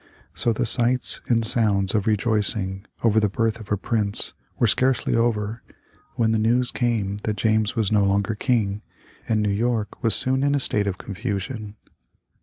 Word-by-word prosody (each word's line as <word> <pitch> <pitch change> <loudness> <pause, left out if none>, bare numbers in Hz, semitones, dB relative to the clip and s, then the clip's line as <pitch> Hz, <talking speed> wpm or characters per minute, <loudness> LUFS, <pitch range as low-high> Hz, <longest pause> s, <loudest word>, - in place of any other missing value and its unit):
So 120 - +2
the 110 - -1
sights 125 +2 +3
and 115 -2 +1
sounds 105 -5 +1
of 105 -2 0
rejoicing 105 -3 +1 0.2
over 110 -1 +4
the 105 -1 +1
birth 115 +3 -1
of 110 -2 -12
a 105 - +2
prince 105 0 -1 0.2
were - - +2
scarcely 130 +3 +1
over, 115 -1 0 0.5
when 115 -2 +1
the 110 - +1
news 120 +3 +2
came 105 -5 -1
that 105 -1 -3
James 110 -1 +1
was 110 -3 0
no 105 -2 +3
longer 100 +2 +1
King, 105 -3 -1 0.5
and 110 -2 +1
New 105 - +1
York 110 0 -2
was 115 - +3
soon 130 +1 +1
in 140 0 +2
a - - +1
state 105 -5 0
of 95 -2 -2
confusion. 105 +1 -5
110 Hz, 175 wpm, -23 LUFS, 100-115 Hz, 0.5 s, over